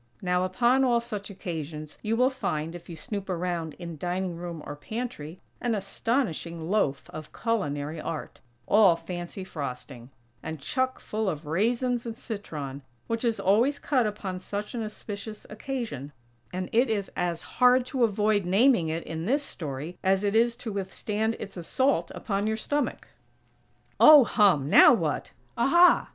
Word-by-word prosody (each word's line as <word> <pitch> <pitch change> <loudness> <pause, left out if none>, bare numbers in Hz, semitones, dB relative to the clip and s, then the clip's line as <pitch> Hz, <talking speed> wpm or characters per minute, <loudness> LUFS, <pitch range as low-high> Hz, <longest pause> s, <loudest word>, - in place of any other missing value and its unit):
Now, 180 0 +1
upon 240 +8 +3
all 240 -2 +3
such 215 -4 -6
occasions 155 -5 -6
you 220 +1 0
will 250 +3 +3
find, 160 -10 -3
if 175 0 -10
you 170 - -6
snoop 195 +4 -5
around 175 -3 -2
in 170 -3 -8
dining 180 +1 -2
room 170 -2 -6
or 145 - -6
pantry, 185 -2 -6 0.2
an 240 -2 +1
astonishing 195 - -2
loaf 160 -5 0
of 155 0 -8
culinary 155 -9 -2
art, 155 - -5 0.3
all 200 -5 +6
fancy 175 +2 -6
frosting, 130 -6 -7 0.3
and 160 -1 -6
chuck 260 - -1
full 215 -1 -2
of 155 -2 -5
raisins 235 - 0
and 225 -1 -5
citron, 150 - -6 0.2
which 230 +1 -2
is 230 -2 +1
always 235 +9 +3
cut 255 -7 +1
upon 195 -3 -4
such 205 +2 -5
an 235 - -3
auspicious 215 0 -7
occasion; 215 - -5 0.4
and 185 0 -3
it 240 +3 +3
is 205 -3 -1
as 175 -2 -2 0.2
hard 250 0 +6
to 255 -1 0
avoid 210 -1 +2
naming 195 -1 +4
it, 165 +1 -2
in 160 +1 -5
this 280 +4 +2
story, 155 - -6
as 190 +1 +2
it 205 +1 +1
is 235 +1 +4
to 235 -2 -6
withstand 210 +3 -2
its 195 -2 -7
assault 260 +10 +1
upon 200 -1 -2
your 220 0 0
stomach. 290 +6 -2 0.9
Oh 300 -3 +10
hum! 195 - +3
Now 175 - +8
what? 160 -8 -2 0.2
Aha! 345 +9 +5
200 Hz, 160 wpm, -27 LUFS, 165-230 Hz, 0.9 s, Oh